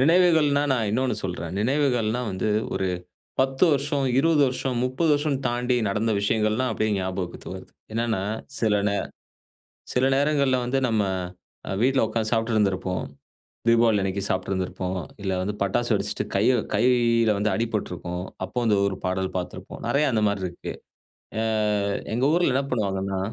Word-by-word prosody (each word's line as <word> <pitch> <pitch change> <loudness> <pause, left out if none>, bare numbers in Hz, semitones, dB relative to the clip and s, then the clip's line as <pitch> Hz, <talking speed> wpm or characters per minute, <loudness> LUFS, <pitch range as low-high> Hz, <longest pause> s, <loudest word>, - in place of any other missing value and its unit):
நினைவுகள்ன்னா, 160 -2 +4
நான் 115 -5 0
இன்னொன்னு 125 +2 +1
சொல்றேன். 90 -2 -4
நினைவுகள்ன்னா 125 -2 +1
வந்து 95 +3 -2 0.3
ஒரு 95 - 0 0.5
10 135 +2 +1
வருஷம், 140 0 0 0.2
20 160 0 +3
வருஷம், 130 0 -2
30 130 +6 0
வருஷம்னு 145 -2 0
தாண்டி 125 +1 0
நடந்த 110 +3 0
விஷயங்கள்லாம் 110 +4 +1
அப்படியே 110 0 0
ஞாபகத்திற்கு 95 -1 -4
வருது. - - -11 0.2
என்னன்னா 115 -3 0 0.4
சில 110 -2 +2
நேர 100 - 0 0.9
சில 125 +1 +2
நேரங்கள்ல 140 -2 +2
வந்து 125 +2 0
நம்ம 110 -2 +2 0.8
வீட்ல 130 -1 +3
உட்கார்ந்து 110 -1 -1
சாப்பிட்டு 115 0 +1
இருந்திருப்போம். 95 -3 0 0.6
தீபாவளி 115 -2 +4
அன்னைக்கு 95 +1 -1
சாப்பிட்டுருந்துருப்போம். 95 0 -2 0.2
இல்ல 95 -1 -1
வந்து 100 +3 -2
பட்டாசு 100 -1 0
வெடிச்சுட்டு - - -1
கை 100 - +3 0.3
கையில 115 0 +3
வந்து 105 +2 +1
அடிபட்டிருக்கும். 90 -6 -3 0.2
அப்போ 95 +6 -11
வந்து 110 -3 +3
ஒரு 100 - -2
பாடல் 95 +1 -1
பார்த்திருப்போம். 90 - -7
நிறைய 145 +1 +2
அந்த 110 -2 +1
மாரி 100 -2 -1
இருக்கு. 85 -1 -6 0.7
அ 110 - +1 0.7
எங்க 125 +3 +1
ஊர்ல 175 -4 +3
என்ன 135 +2 +1
பண்ணுவாங்கன்னா 95 -4 -1
115 Hz, 140 wpm, -25 LUFS, 100-130 Hz, 0.9 s, நினைவுகள்ன்னா